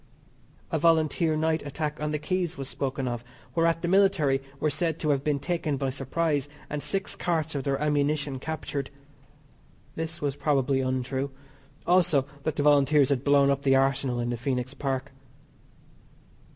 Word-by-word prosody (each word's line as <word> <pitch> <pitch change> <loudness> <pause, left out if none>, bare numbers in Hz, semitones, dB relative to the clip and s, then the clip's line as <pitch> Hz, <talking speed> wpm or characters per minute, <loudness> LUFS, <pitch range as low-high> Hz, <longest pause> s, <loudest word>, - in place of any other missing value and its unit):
A 160 - +1
Volunteer 160 0 +3
night 160 0 +1
attack 150 +1 -4
on 150 0 -1
the 150 - 0
Quays 180 +1 -2
was 135 -1 -5
spoken 135 -1 -3
of, 120 -1 -3 0.3
whereat 165 +2 +2
the - - 0
military 180 -8 +3 0.2
were 155 - +1
said 165 -2 0
to 155 - -2
have 140 -1 0
been 150 -1 +1
taken 160 -2 -1
by 135 -1 -1
surprise 145 +2 -1 0.2
and 150 0 -2
six 195 +5 -2
carts 160 -2 -1
of 140 -2 -2
their 135 -1 0
ammunition 145 -2 0
captured. 145 -2 -4 1.0
This 165 +1 -4
was 140 -2 -1
probably 140 -2 +1
untrue. 130 +1 -1 0.6
Also, 170 -6 +4 0.2
that 155 +2 -2
the 145 - 0
Volunteers 145 -1 +5
had 135 -2 0
blown 140 -1 +5
up 140 0 0
the 135 -1 +4
Arsenal 135 -2 +1
in 120 0 -1
the 120 - -2
Phoenix 125 +1 -2
Park. 135 -2 -3
145 Hz, 165 wpm, -27 LUFS, 135-160 Hz, 1.0 s, Volunteers